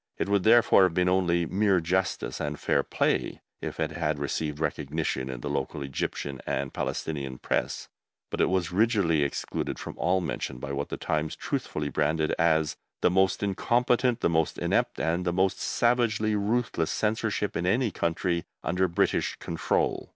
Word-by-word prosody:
It - - -1
would, 100 -1 +2
therefore, 110 0 +6
have 90 -3 +3
been 90 0 +2
only 90 -2 +2
mere 95 +1 +2
justice 90 +2 -1
and 75 0 -3
fair - - +2
play - - 0 0.2
if - - -5
it 80 -1 0
had 80 -2 -1
received 75 +1 -2
recognition 75 -3 -2
in 65 -2 -5
the - - -4
local 70 +1 -2
Egyptian 70 0 -4
and 70 -1 -2
Palestinian 70 -5 -3
Press, - - -2 0.4
but - - -1
it - - +3
was 90 -2 0
rigidly 100 -6 +2
excluded 70 - -2
from - - -7
all 90 +2 +2
mention 85 -7 -4
by 70 +2 -6
what 70 +1 -3
the - - -4
Times 75 0 -1
truthfully 75 -1 -3
branded 75 +3 +1
as 80 -2 +2 0.2
"the - - +4
most 95 +2 +2
incompetent, 120 +4 +1
the - - +3
most 80 -2 +1
inept, - - 0
and 85 +3 0
the 90 - 0
most 95 +2 +1
savagely 120 -3 +1
ruthless 105 -5 0
censorship 105 -1 -1
in 90 - -1
any 115 +3 +2
country 85 0 -1 0.2
under 95 +1 +1
British 85 - +1
control." 80 - -1
85 Hz, 165 wpm, -27 LUFS, 75-100 Hz, 0.4 s, therefore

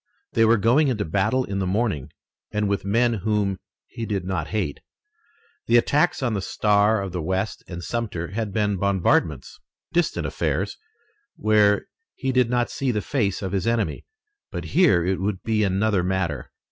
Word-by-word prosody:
They 115 - +4
were 115 +1 +5
going 120 +9 +3
into 110 -6 0
battle 100 +10 +1
in 100 -1 -3
the 95 - -1
morning 95 - -1 0.4
and 105 0 0
with 100 0 -1
men 115 +4 +2
whom 100 -2 0 0.3
he 115 -1 -6
did 100 -4 -2
not 90 -5 -2
hate. 95 -10 -2 0.9
The 120 - +5
attacks 150 +5 +2
on 120 -3 +1
the 100 - -1
Star 105 +2 +2
of 100 -2 -4
the 90 0 -3
West 95 +5 -2
and 90 -1 -7
Sumter 100 -8 -3
had 110 +1 -3
been 105 -1 0
bombardments, 100 -1 +1 0.3
distant 175 -1 +1
affairs, - - -2 0.6
where 105 -1 +3 0.3
he 135 -1 -1
did 125 -2 +3
not 120 0 0
see 135 - -2
the 105 -4 0
face 105 -7 -1
of 95 - -3
his 100 +2 -1
enemy, 115 -9 0 0.5
but - - -5
here 100 - +4
it 95 0 0
would 95 -1 -2
be 110 -1 +1
another 100 0 +2
matter. 90 -4 -2
105 Hz, 170 wpm, -24 LUFS, 95-115 Hz, 0.9 s, were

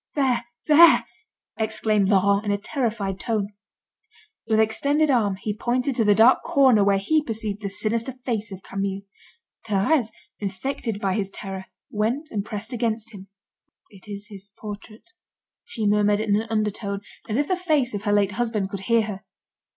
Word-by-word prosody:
"There, 265 -4 +1 0.2
there!" 325 +2 +7 0.5
exclaimed 215 -2 +1
Laurent 200 +1 +3
in 205 - -1
a 200 - +1
terrified 215 -5 -2
tone. 215 -3 -1 1.0
With 220 -1 +2
extended 280 +7 +2
arm, 210 -6 +2
he 205 +2 -4
pointed 250 +3 -1
to 230 - +2
the 205 -1 +4
dark 225 +5 +6
corner 260 -7 +4
where 200 0 +3
he 300 +11 +2
perceived 215 -5 -4
the 200 - -3
sinister 230 +5 -1
face 225 -3 -2
of 190 0 -9
Camille. 195 0 -3 0.6
Thérèse, 220 +5 +2 0.3
infected 210 +2 -3
by 195 -3 0
his 195 -1 -1
terror, 195 -1 -7 0.3
went 235 +9 -1
and 205 -2 -2
pressed 215 +3 -5
against 230 -1 -2
him. 195 -1 -11 0.6
"It 195 0 -16
is 205 +1 -8
his 200 -1 -9
portrait," 215 - -10 0.5
she 220 -3 -4
murmured 205 0 +3
in 210 -2 +1
an 220 +2 -1
undertone, 210 -2 -2 0.3
as 215 - 0
if 290 +1 +1
the 370 - +1
face 310 -9 0
of 205 - -3
her 205 - +1
late 205 -1 +3
husband 210 -2 -2
could 200 - -4
hear 230 -1 +4
her. 210 -1 -6
215 Hz, 165 wpm, -24 LUFS, 200-235 Hz, 1.0 s, there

